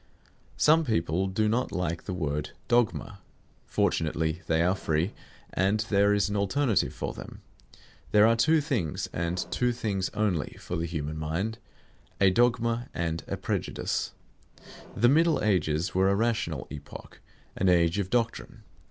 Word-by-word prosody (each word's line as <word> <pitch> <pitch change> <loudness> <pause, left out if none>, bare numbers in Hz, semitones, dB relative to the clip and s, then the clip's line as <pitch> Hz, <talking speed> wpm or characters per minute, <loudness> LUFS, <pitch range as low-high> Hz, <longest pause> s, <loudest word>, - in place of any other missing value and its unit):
Some 160 +2 +5
people 90 - 0
do 105 +3 0
not 120 +4 0
like 85 -2 -2
the 95 - -3
word 75 -3 -3
"dogma." 115 -3 +1 0.5
Fortunately 80 +1 0
they 80 0 +2
are 90 +2 +3
free, 85 0 -1 0.4
and 100 +3 +2
there 100 0 +4
is 105 0 +2
an 105 - -3
alternative 105 +3 +1
for - - -4
them. - - -10 0.7
There 105 0 +6
are 115 +1 +5
two 155 +7 +3
things, 120 - -2
and 85 +1 -2
two 125 0 +1
things 105 -5 -2
only, 100 -8 -1
for - - -5
the 85 +1 -2
human 75 -2 -4
mind, 95 +9 -2 0.6
a 95 -1 +5
dogma 120 +2 +1
and 85 -1 -2
a - - -3
prejudice. - - -2 0.8
The 120 - +5
Middle 160 +3 +3
Ages 85 -5 +1
were 95 +1 +3
a 100 - +3
rational 115 +2 -1
epoch, 75 - -10 0.3
an 95 - +2
age 85 +1 +3
of 95 -2 -2
doctrine. 115 0 -2
100 Hz, 150 wpm, -28 LUFS, 85-115 Hz, 0.8 s, There